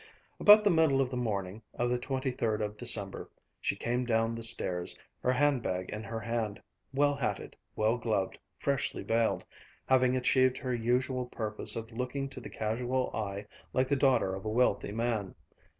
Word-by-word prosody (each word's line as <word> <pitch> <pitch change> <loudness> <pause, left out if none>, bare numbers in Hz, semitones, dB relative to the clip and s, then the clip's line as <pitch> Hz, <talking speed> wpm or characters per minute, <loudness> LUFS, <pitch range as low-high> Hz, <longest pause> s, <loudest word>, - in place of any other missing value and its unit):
About 210 +1 +8
the 205 - +4
middle 160 -5 +4
of 130 -2 +1
the - - -3
morning 105 -4 -2
of 120 - 0
the 125 - +1
twenty 130 0 -2
third 110 -3 -1
of 105 -1 -3
December, 105 -4 -1 0.3
she - - 0
came 120 +2 -1
down 115 -1 +1
the 115 - -5
stairs, 90 -6 +2 0.2
her 125 - +2
hand 140 0 +2
bag 90 -3 -3
in 105 +1 -5
her 115 0 -4
hand, 110 -2 -2 0.3
well 145 +1 +3
hatted, 140 - -3 0.2
well 110 +3 +1
gloved, 110 -5 -1 0.2
freshly 140 -2 -1
veiled, 115 0 +1 0.4
having 130 -1 +3
achieved 130 0 +3
her 130 -2 -3
usual 125 +2 0
purpose 110 -3 -3
of 115 +1 -6
looking 125 +4 -3
to 135 - -9
the - - -8
casual 125 +4 -1
eye 100 -2 -3 0.3
like 130 0 +2
the 140 - +2
daughter 130 -8 +3
of 95 0 -6
a 110 - -2
wealthy 110 -3 +1
man. 110 -3 -2
120 Hz, 180 wpm, -31 LUFS, 110-130 Hz, 0.4 s, About